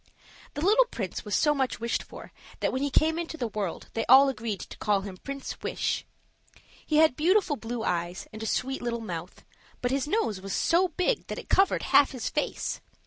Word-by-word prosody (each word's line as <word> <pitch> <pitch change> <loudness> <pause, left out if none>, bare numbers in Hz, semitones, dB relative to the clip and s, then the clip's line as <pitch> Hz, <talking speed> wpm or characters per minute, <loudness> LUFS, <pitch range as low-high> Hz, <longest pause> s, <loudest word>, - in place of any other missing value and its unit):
The 290 - -2
little 445 +6 +6
prince 195 - -5
was 210 - -2
so 295 -1 +3
much 265 -3 -1
wished 235 0 -1
for - - -11 0.3
that - - 0
when 260 - -1
he 285 - +1
came 320 +4 +2
into 330 -1 -5
the 245 - -2
world 200 -5 -4
they 225 - -1
agreed 250 -6 +5
to - - -9
call 205 -2 +2
him 195 -1 -7
Prince 275 +6 -7
Wish. - - -2 0.8
He 305 - 0
had 315 -4 +5
beautiful 355 +1 +3
blue 235 -2 -5
eyes 175 -1 -2
and 215 - -8
a 220 - -3
sweet 265 +4 -1
little 235 -1 -2
mouth, 175 -4 -7 0.3
but 245 - -1
his 275 +1 0
nose 295 - 0
was 195 0 -5
so 355 +3 +3
big 365 +8 -1
that - - -5
it - - -9
covered 390 +1 +3
half 285 - +5
his 255 - -3
face. - - -2
260 Hz, 200 wpm, -28 LUFS, 215-315 Hz, 0.8 s, little